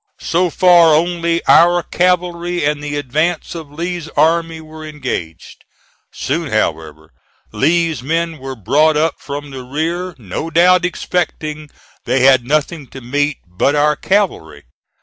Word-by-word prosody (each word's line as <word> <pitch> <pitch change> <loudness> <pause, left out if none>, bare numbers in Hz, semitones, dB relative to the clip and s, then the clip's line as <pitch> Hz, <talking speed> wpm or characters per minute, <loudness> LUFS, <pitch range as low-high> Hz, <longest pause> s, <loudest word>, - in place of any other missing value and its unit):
So 175 +2 +1
far, 170 -2 +5
only 170 +1 0
our 175 0 +5
cavalry 175 -2 0
and 150 0 -1
the 145 0 -4
advance 150 +4 -1
of 160 -4 -8
Lee's 170 +1 -5
army 165 0 +2
were 155 0 -11
engaged. 130 - -6 0.5
Soon, 155 +2 -3
however, 80 -7 -2 0.4
Lee's 160 +3 +1
men 165 +3 -2
were 135 0 -6
brought 150 - +2
up 155 0 0
from 145 +1 -7
the 135 -1 -7
rear, 165 +7 -3
no 115 - -5
doubt 180 +2 +4
expecting 155 -4 -3 0.4
they 130 - +1
had 130 -1 +5
nothing 150 0 -1
to 135 - -10
meet 145 +3 -1
but 90 +11 0
our 150 +1 +3
cavalry. 190 - -1
155 Hz, 135 wpm, -17 LUFS, 140-170 Hz, 0.5 s, far